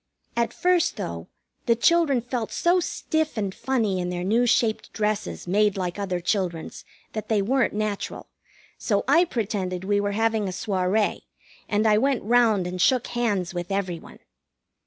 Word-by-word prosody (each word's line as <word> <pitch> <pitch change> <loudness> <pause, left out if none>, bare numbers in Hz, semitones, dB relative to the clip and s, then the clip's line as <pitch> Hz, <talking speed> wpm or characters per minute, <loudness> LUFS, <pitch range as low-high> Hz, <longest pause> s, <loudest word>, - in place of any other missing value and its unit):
At 235 -1 +1
first, 360 -2 +2
though, 85 0 -5 0.4
the 235 - +5
children 290 0 +3
felt 240 -1 -4
so 350 +2 +2
stiff 315 -4 -2
and 200 -3 -1
funny 220 -8 0
in 180 0 -2
their 175 0 -3
new 230 +6 +2
shaped 225 -2 +1
dresses 215 0 -2
made 205 +2 +2
like 180 0 -3
other 185 -3 -2
children's 175 -2 -2 0.3
that 215 - -5
they 220 -2 +3
weren't 240 +3 +1
natural, 210 -1 -3 0.5
so - - 0
I 345 +2 +5
pretended 195 - -3
we 205 +1 +1
were 205 0 -1
having 220 -1 +1
a - - -2
soirée, 190 +2 0 0.5
and 210 +1 +1
I 210 -1 +5
went 270 0 +1
round 225 -4 +3
and 180 0 -3
shook 255 +2 +3
hands 205 -8 0
with 175 0 -4
every 185 -4 -1
one. - - -14
210 Hz, 165 wpm, -25 LUFS, 185-240 Hz, 0.5 s, the